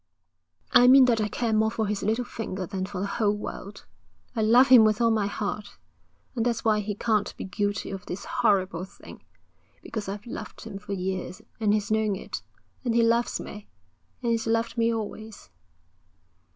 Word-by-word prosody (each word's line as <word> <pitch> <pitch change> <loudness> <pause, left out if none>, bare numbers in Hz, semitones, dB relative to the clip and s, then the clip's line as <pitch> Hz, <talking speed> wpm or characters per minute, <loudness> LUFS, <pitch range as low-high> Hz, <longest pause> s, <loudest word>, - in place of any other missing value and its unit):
'I 245 0 +7
mean 265 +1 +8
that 235 -3 +2
I 210 - +1
care 225 +1 -1
more 220 0 +3
for 220 0 -2
his 205 0 -2
little 225 +4 0
finger 190 -6 -5
than 190 0 -4
for 200 -2 -6
the 195 - -1
whole 205 0 0
world. 200 -1 -8 0.5
I 225 - 0
love 240 +5 +6
him 250 -3 +9
with 215 -1 +3
all 230 -1 +4
my 215 -3 +1
heart. 205 0 -4 0.6
And 230 - 0
that's 235 -1 -1
why 215 -1 +3
he 210 0 -3
can't 210 -1 0
be - - -5
guilty 205 +1 -2
of 195 -1 -7
this 180 - -5
horrible 195 -7 +1
thing, 190 - -13 0.6
because 210 -3 -5
I've 205 +1 -6
loved 225 -2 -8
him 210 -3 -7
for 200 - -6
years, 190 +1 -4 0.2
and 215 -2 +2
he's 210 0 0
known 215 -2 +2
it. 185 - -6 0.4
And 235 -3 0
he 235 - +5
loves 235 +1 +2
me, 210 0 -9 0.6
and 235 - +1
he's 230 -1 0
loved 230 +1 0
me 230 -1 +2
always.' 220 -1 -6
215 Hz, 190 wpm, -26 LUFS, 200-230 Hz, 0.6 s, him